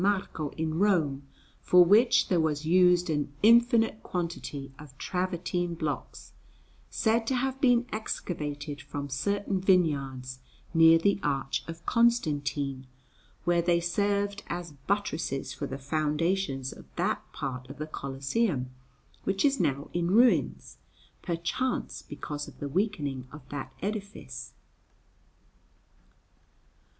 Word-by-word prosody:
Marco 190 Hz, -6 st, 0 dB
in 160 Hz, 0 st, -1 dB
Rome, 155 Hz, -9 st, +2 dB, 0.3 s
for 180 Hz, 0 st, +6 dB
which 220 Hz, +7 st, +5 dB
there 180 Hz, -, +2 dB
was 155 Hz, -1 st, 0 dB
used 180 Hz, +1 st, +5 dB
an 145 Hz, -2 st, -1 dB
infinite 230 Hz, -1 st, +5 dB
quantity 165 Hz, -6 st, -4 dB
of 145 Hz, -3 st, -13 dB
travertine 175 Hz, -1 st, -2 dB
blocks, 155 Hz, -3 st, -5 dB, 0.6 s
said 225 Hz, 0 st, +1 dB
to 265 Hz, -, +1 dB
have 265 Hz, +2 st, -1 dB
been 245 Hz, -3 st, +4 dB
excavated 150 Hz, -8 st, -4 dB
from 140 Hz, +1 st, -6 dB
certain 200 Hz, +7 st, -1 dB
vineyards 140 Hz, -9 st, +1 dB, 0.3 s
near 165 Hz, 0 st, +7 dB
the 200 Hz, +4 st, +2 dB
Arch 135 Hz, -2 st, -1 dB
of 165 Hz, 0 st, -8 dB
Constantine, 145 Hz, -, +1 dB, 0.6 s
where 175 Hz, 0 st, +3 dB
they 170 Hz, 0 st, +3 dB
served 200 Hz, +3 st, 0 dB
as 175 Hz, -1 st, -4 dB, 0.2 s
buttresses 155 Hz, -9 st, -1 dB
for 135 Hz, -, -4 dB
the 135 Hz, -, -5 dB
foundations 150 Hz, 0 st, -1 dB
of -, -, -14 dB
that -, -, 0 dB
part 130 Hz, -2 st, -5 dB
of 140 Hz, -, -9 dB
the 155 Hz, -, -3 dB
Colosseum 135 Hz, -, -2 dB, 0.5 s
which 195 Hz, +4 st, +1 dB
is 280 Hz, -1 st, +3 dB
now 140 Hz, +2 st, 0 dB
in 175 Hz, 0 st, 0 dB
ruins, 235 Hz, +6 st, +3 dB, 0.4 s
perchance 175 Hz, +9 st, -2 dB
because 145 Hz, -1 st, -6 dB
of -, -, -13 dB
the 145 Hz, -, -3 dB
weakening 145 Hz, -, -1 dB
of 150 Hz, -, -12 dB
that 135 Hz, -2 st, -5 dB
edifice. 205 Hz, 0 st, -5 dB
170 Hz, 120 wpm, -28 LUFS, 145-200 Hz, 0.6 s, near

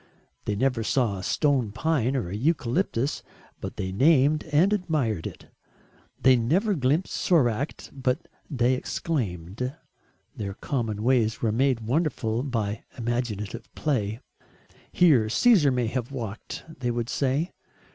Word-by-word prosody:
They 105 Hz, -, -1 dB
never 125 Hz, +1 st, +1 dB
saw 110 Hz, -4 st, +1 dB
a -, -, -7 dB
stone 130 Hz, -2 st, +1 dB
pine 135 Hz, 0 st, 0 dB
or 125 Hz, -9 st, -1 dB
a 95 Hz, -, -4 dB
eucalyptus 135 Hz, -, 0 dB, 0.4 s
but -, -, -6 dB
they 95 Hz, -1 st, -3 dB
named 145 Hz, -, +4 dB
and 160 Hz, +7 st, +3 dB
admired 150 Hz, -, 0 dB
it; -, -, -10 dB, 0.7 s
they 130 Hz, -1 st, +6 dB
never 170 Hz, -, +2 dB
glimpsed 150 Hz, +3 st, +1 dB
Soracte 140 Hz, -, +1 dB
but 130 Hz, -2 st, -1 dB, 0.2 s
they 125 Hz, -3 st, +2 dB
exclaimed. 125 Hz, -, -3 dB, 0.6 s
Their 100 Hz, -2 st, -5 dB
common 110 Hz, -5 st, -2 dB
ways 115 Hz, -3 st, +2 dB
were 110 Hz, -, +2 dB
made 125 Hz, +1 st, +2 dB
wonderful 120 Hz, -3 st, 0 dB
by 115 Hz, -6 st, -2 dB
imaginative 115 Hz, -2 st, -3 dB
play. 110 Hz, -7 st, -1 dB, 0.7 s
"Here 135 Hz, -12 st, +4 dB
Caesar 185 Hz, -, +5 dB
may 125 Hz, -1 st, +1 dB
have 120 Hz, +2 st, -3 dB
walked," 115 Hz, -5 st, -6 dB, 0.2 s
they 120 Hz, -2 st, -1 dB
would 120 Hz, -1 st, -1 dB
say. 140 Hz, +7 st, 0 dB
125 Hz, 130 wpm, -26 LUFS, 110-145 Hz, 0.7 s, they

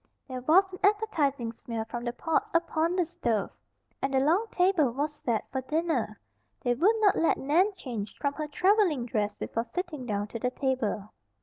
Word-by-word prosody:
There 255 Hz, -2 st, -5 dB
was 370 Hz, +8 st, +4 dB
an 365 Hz, -, -7 dB
appetizing 305 Hz, -, +1 dB
smell 230 Hz, -1 st, -5 dB
from 240 Hz, +1 st, -5 dB
the 240 Hz, -, 0 dB
pots 320 Hz, +6 st, -1 dB
upon 335 Hz, 0 st, +1 dB
the 360 Hz, -2 st, +2 dB
stove, 245 Hz, -, -1 dB, 0.5 s
and 270 Hz, -, 0 dB
the -, -, +5 dB
long 335 Hz, +11 st, +2 dB
table 360 Hz, -8 st, +3 dB
was 290 Hz, +5 st, -2 dB
set 235 Hz, -7 st, -2 dB
for 265 Hz, -, -2 dB
dinner. 275 Hz, -7 st, -1 dB, 0.4 s
They 245 Hz, -, +2 dB
would 365 Hz, -, +3 dB
not 410 Hz, -3 st, +5 dB
let 330 Hz, -, +3 dB
Nan 335 Hz, +9 st, +3 dB
change 230 Hz, -, -6 dB
from 280 Hz, 0 st, -1 dB
her 305 Hz, +1 st, -4 dB
traveling 360 Hz, -, +2 dB
dress 210 Hz, -3 st, -1 dB
before 230 Hz, -, -2 dB
sitting 315 Hz, -5 st, -5 dB
down 205 Hz, -2 st, -1 dB
to 230 Hz, -, -5 dB
the 250 Hz, -, 0 dB
table. 250 Hz, -6 st, -2 dB
285 Hz, 185 wpm, -28 LUFS, 240-345 Hz, 0.5 s, the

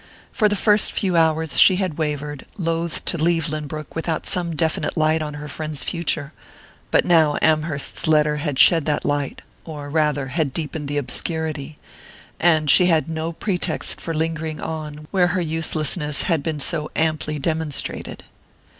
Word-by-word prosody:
For 215 Hz, -4 st, +2 dB
the 205 Hz, -, +1 dB
first 210 Hz, +1 st, +5 dB
few 185 Hz, -3 st, +1 dB
hours 160 Hz, -1 st, +2 dB
she 185 Hz, -, +7 dB
had 180 Hz, -5 st, -2 dB
wavered, 150 Hz, -2 st, -3 dB
loath 165 Hz, -2 st, -2 dB
to 170 Hz, -, +1 dB
leave 165 Hz, 0 st, +1 dB
Lynbrook 155 Hz, 0 st, -5 dB
without 160 Hz, 0 st, -2 dB
some 175 Hz, -3 st, 0 dB
definite 160 Hz, +2 st, -1 dB
light 155 Hz, 0 st, +2 dB
on 150 Hz, -1 st, -4 dB
her 150 Hz, 0 st, -7 dB
friend's 155 Hz, 0 st, -4 dB
future; 160 Hz, -4 st, -2 dB, 0.6 s
but -, -, +3 dB
now 160 Hz, -4 st, +4 dB
Amherst's 155 Hz, -3 st, 0 dB
letter 150 Hz, -1 st, +3 dB
had 145 Hz, -2 st, -2 dB
shed 165 Hz, +1 st, +6 dB
that 150 Hz, -, 0 dB
light 145 Hz, -1 st, -2 dB, 0.2 s
or 145 Hz, -3 st, -8 dB
rather, 150 Hz, -3 st, +1 dB
had 145 Hz, -1 st, -1 dB
deepened 155 Hz, -2 st, -3 dB
the 145 Hz, +1 st, -2 dB
obscurity 155 Hz, +1 st, -3 dB, 0.6 s
and 160 Hz, -3 st, +3 dB
she 180 Hz, +5 st, +6 dB
had 165 Hz, -3 st, +2 dB
no 160 Hz, +1 st, -3 dB
pretext 180 Hz, -1 st, -2 dB
for 165 Hz, -, -4 dB
lingering 160 Hz, -1 st, -2 dB
on 150 Hz, -1 st, -6 dB
where 185 Hz, -3 st, +3 dB
her 185 Hz, 0 st, 0 dB
uselessness 155 Hz, -2 st, -2 dB
had 165 Hz, -5 st, +1 dB
been 155 Hz, 0 st, -3 dB
so 150 Hz, +1 st, -1 dB
amply 155 Hz, -1 st, -1 dB
demonstrated. 155 Hz, 0 st, -3 dB
155 Hz, 160 wpm, -22 LUFS, 150-165 Hz, 0.6 s, she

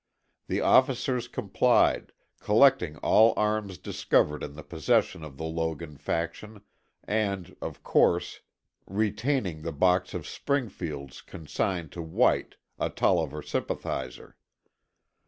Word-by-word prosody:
The -, -, -1 dB
officers 125 Hz, -2 st, +3 dB
complied, -, -, +2 dB, 0.3 s
collecting 105 Hz, -, +4 dB
all 110 Hz, +1 st, +5 dB
arms 105 Hz, -3 st, 0 dB
discovered 75 Hz, 0 st, +1 dB
in 70 Hz, -, -6 dB
the 75 Hz, -, -9 dB
possession 80 Hz, 0 st, 0 dB
of 75 Hz, -3 st, -10 dB
the 80 Hz, -, -6 dB
Logan 80 Hz, -1 st, -3 dB
faction, 85 Hz, +8 st, -4 dB, 0.4 s
and, 100 Hz, -4 st, -2 dB
of -, -, -6 dB
course, -, -, +2 dB, 0.5 s
retaining 105 Hz, -, -1 dB
the 80 Hz, -, -4 dB
box 90 Hz, +4 st, +2 dB
of -, -, -5 dB
Springfields 85 Hz, -, -3 dB
consigned 85 Hz, 0 st, -3 dB
to 85 Hz, -, -6 dB
White, 80 Hz, 0 st, +1 dB, 0.2 s
a -, -, 0 dB
Tolliver 75 Hz, +2 st, 0 dB
sympathizer. 65 Hz, -2 st, -4 dB
85 Hz, 110 wpm, -27 LUFS, 75-105 Hz, 0.5 s, all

